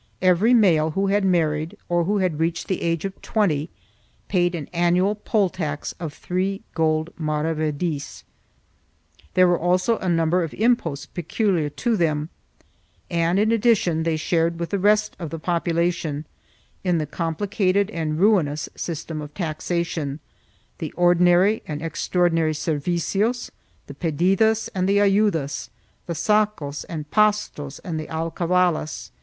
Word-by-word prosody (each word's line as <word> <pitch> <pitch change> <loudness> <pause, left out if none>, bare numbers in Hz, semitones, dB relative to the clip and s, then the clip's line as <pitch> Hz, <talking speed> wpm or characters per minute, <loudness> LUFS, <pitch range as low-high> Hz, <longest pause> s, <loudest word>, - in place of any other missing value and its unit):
Every 185 +7 +5
male 165 -8 +4
who 195 - +2
had 205 0 +2
married, 160 -4 +1
or 175 -1 +1
who 205 +3 +1
had 180 -6 0
reached 165 0 -1
the 190 - -2
age 165 +1 -1
of 195 0 -6
20, 165 -8 0 0.6
paid 175 -2 +2
an 150 -4 -5
annual 175 +3 +2
poll 210 -1 +1
tax 155 -6 -4
of 165 -3 -4
three 190 +6 -3
gold 160 0 0
maravedis; 155 0 -2 1.1
there 185 - +6
were 175 -1 +2
also 185 +6 +1
a 185 - -2
number 165 +1 +2
of 165 -3 -4
im 240 +3 +4
posts 150 -10 -6
peculiar 175 -2 -1 0.2
to 235 -1 +3
them, 155 -4 0 0.8
and, 170 +1 +1
in 215 +2 +3
addition, 210 -8 +2
they 160 -1 0
shared 165 +1 0
with 170 - -4
the 200 - 0
rest 210 +2 +2
of 165 -3 -5
the 165 - -5
population 170 -2 -1 0.6
in 180 -2 +2
the 155 - -1
complicated 190 +5 0
and 155 -3 -2
ruinous 170 -8 +2
system 160 -1 -5
of 150 0 -8
taxation 165 -3 -2 0.3
— - - -38
the - - -4
ordinary 175 +4 +4
and 150 0 -5
extraordinary 165 0 +1
servicios, 175 - -1 0.3
the 140 - -9
pedi 170 +5 +1
das 220 +2 +2
and 185 0 -1
ayudas, 200 -8 +2 0.4
the 170 - -2
sacos 205 -6 0
and 150 -3 -6
pastos 210 -10 +1
and 165 -5 -3
the 155 - -6
alcavalas. 165 0 -1
170 Hz, 145 wpm, -23 LUFS, 155-195 Hz, 1.1 s, there